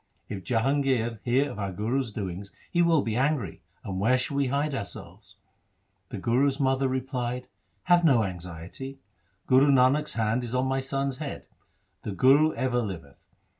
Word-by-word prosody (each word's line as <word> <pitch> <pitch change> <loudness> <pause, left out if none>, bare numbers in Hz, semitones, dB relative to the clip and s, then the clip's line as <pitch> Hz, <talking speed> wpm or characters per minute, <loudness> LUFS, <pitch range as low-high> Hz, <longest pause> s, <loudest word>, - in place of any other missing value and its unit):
If 95 -2 -5
Jahangir 125 -2 +1
hear 130 +4 +2
of 100 - -8
our 100 -1 -2
Guru's 115 +6 -1
doings 100 -1 -5 0.2
he 175 - +2
will 165 -4 +4
be 110 -1 -2
angry; 130 - 0 0.2
and 95 -1 -4
where 120 +6 +3
shall 130 +2 -3
we 140 -1 +2
hide 140 +3 0
ourselves? 100 -9 -6 0.4
' 95 0 -46
The - - -5
Guru's 130 +7 +1
mother 135 0 +2
replied, 125 -1 -3 0.2
' 90 - -44
Have 175 -1 +4
no 130 -9 +5
anxiety. 90 +8 -7 0.5
Guru 130 +2 +5
Nanak's 140 +2 +4
hand 115 +2 0
is 120 +1 -4
on 130 +1 +1
my 135 0 0
son's 135 0 -2
head. 150 -2 -6 0.6
The 105 - -5
Guru 140 +8 +5
ever 125 -2 0
liveth. 85 -10 -8
125 Hz, 170 wpm, -27 LUFS, 105-135 Hz, 0.6 s, no